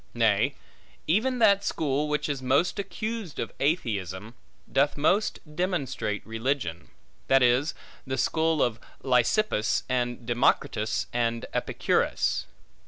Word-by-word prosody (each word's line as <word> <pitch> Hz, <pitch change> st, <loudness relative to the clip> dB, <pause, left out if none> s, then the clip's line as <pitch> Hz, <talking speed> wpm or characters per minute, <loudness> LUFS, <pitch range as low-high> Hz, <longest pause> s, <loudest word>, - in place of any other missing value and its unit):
Nay, -, -, +2 dB, 0.5 s
even 230 Hz, +10 st, +1 dB
that 200 Hz, -4 st, +4 dB
school 150 Hz, -3 st, -1 dB
which 150 Hz, 0 st, 0 dB
is 140 Hz, -3 st, -3 dB
most 140 Hz, +10 st, +1 dB
accused 215 Hz, -3 st, -4 dB
of -, -, -3 dB
atheism 110 Hz, -, -1 dB, 0.4 s
doth 140 Hz, +2 st, +2 dB
most 195 Hz, +9 st, +2 dB, 0.2 s
demonstrate 145 Hz, -, -2 dB
religion; 115 Hz, -, -2 dB, 0.4 s
that 135 Hz, -1 st, +5 dB
is, 125 Hz, +5 st, +3 dB, 0.3 s
the 130 Hz, 0 st, -2 dB
school 160 Hz, -1 st, +2 dB
of 115 Hz, -2 st, -1 dB, 0.2 s
Leucippus 125 Hz, -, +2 dB
and 120 Hz, -1 st, -1 dB
Democritus 115 Hz, -2 st, +1 dB
and 115 Hz, -1 st, 0 dB
Epicurus. -, -, 0 dB
135 Hz, 110 wpm, -27 LUFS, 120-165 Hz, 0.5 s, that